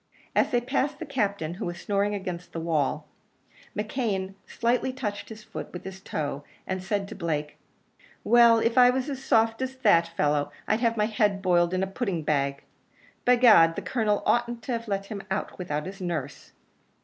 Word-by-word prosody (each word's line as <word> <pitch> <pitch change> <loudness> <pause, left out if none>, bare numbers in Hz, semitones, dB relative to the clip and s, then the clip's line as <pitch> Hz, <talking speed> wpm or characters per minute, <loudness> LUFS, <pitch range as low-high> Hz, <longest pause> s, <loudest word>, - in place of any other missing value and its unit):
As - - +3
they 245 - +2
passed 275 +3 -1
the 330 - -6
Captain, 200 - -1
who 180 - -5
was 175 0 -5
snoring 205 0 0
against 180 -3 -6
the 165 - -3
wall, 160 -4 -1 0.7
McKeon 210 -4 -2
slightly 245 +2 0
touched 215 -6 -5
his 215 -1 -10
foot - - -8
with 180 - -8
his 190 0 -8
toe, 145 -5 -4 0.2
and 185 0 -3
said 195 +1 -2
to 220 - -8
Blake, 155 -6 -3 0.6
"Well; 235 -1 +6
if 230 +2 +2
I 245 0 +8
was 260 +3 -1
as 270 -1 -6
soft 225 +1 +2
as 260 0 -3
that 205 -10 +4
fellow, 150 -3 0 0.2
I'd 215 - +2
have 230 -1 +1
my 210 - +3
head 210 -3 0
boiled 175 -2 +3
in 185 +1 0
a - - +2
pudding 195 -4 -3
bag. 140 -2 0 0.6
By 250 - +6
gad, 210 -10 +6
the 200 - -5
Colonel 210 +1 0
oughtn't 240 -1 +1
to 235 -3 -2
let 195 -1 -2
him 200 -1 -6
out 190 0 -3
without 150 -4 -3
his 195 +1 -8
nurse." 155 -6 -5
200 Hz, 185 wpm, -26 LUFS, 175-235 Hz, 0.7 s, I